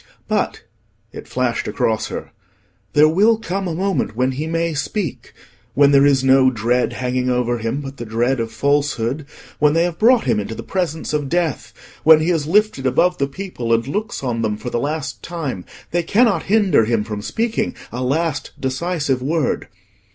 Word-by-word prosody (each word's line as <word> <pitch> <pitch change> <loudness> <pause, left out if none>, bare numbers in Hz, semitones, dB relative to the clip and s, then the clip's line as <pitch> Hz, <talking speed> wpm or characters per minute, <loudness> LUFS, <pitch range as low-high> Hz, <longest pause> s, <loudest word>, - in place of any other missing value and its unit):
"But,"—it - - -5
flashed 125 -2 -1
across 110 +1 0
her—"there 100 +7 -2
will 205 +8 +4
come 195 -3 -3
a 165 - -3
moment 190 - -1
when 130 +2 +1
he 145 +5 -4
may 165 0 -1
speak. 150 - -3 0.4
When 140 0 +5
there 140 0 +6
is 135 -2 +3
no 130 0 +5
dread 120 +1 0
hanging 125 0 -1
over 120 -1 0
him 115 +6 -2
but 135 -1 -8
the 120 - -6
dread 120 +4 0
of 115 -1 -3
falsehood, 140 +1 0 0.3
when 150 0 +4
they 165 +1 +3
have 175 -1 -3
brought 240 +2 +5
him 120 -5 +1
into 105 +2 -5
the - - -7
presence 165 -5 -3
of 145 -2 -1
death, 170 -4 -1 0.3
when 160 0 +8
he 160 +3 +1
is 155 -4 0
lifted 195 -7 +2
above 175 +8 +2
the 140 - +1
people, 140 -7 -5
and 115 +2 +2
looks 205 +2 -3
on 120 -3 -1
them 105 -2 -1
for 125 - -6
the 120 - 0
last 145 +1 -3
time, 150 - -5 0.3
they 175 - +1
cannot 200 0 +2
hinder 200 - +4
him 115 -2 +1
from 105 -1 -5
speaking 225 - -2 0.2
a 125 +2 -3
last 150 +3 -1
decisive 135 0 -1
word. 150 +1 -1
140 Hz, 180 wpm, -20 LUFS, 120-170 Hz, 0.4 s, when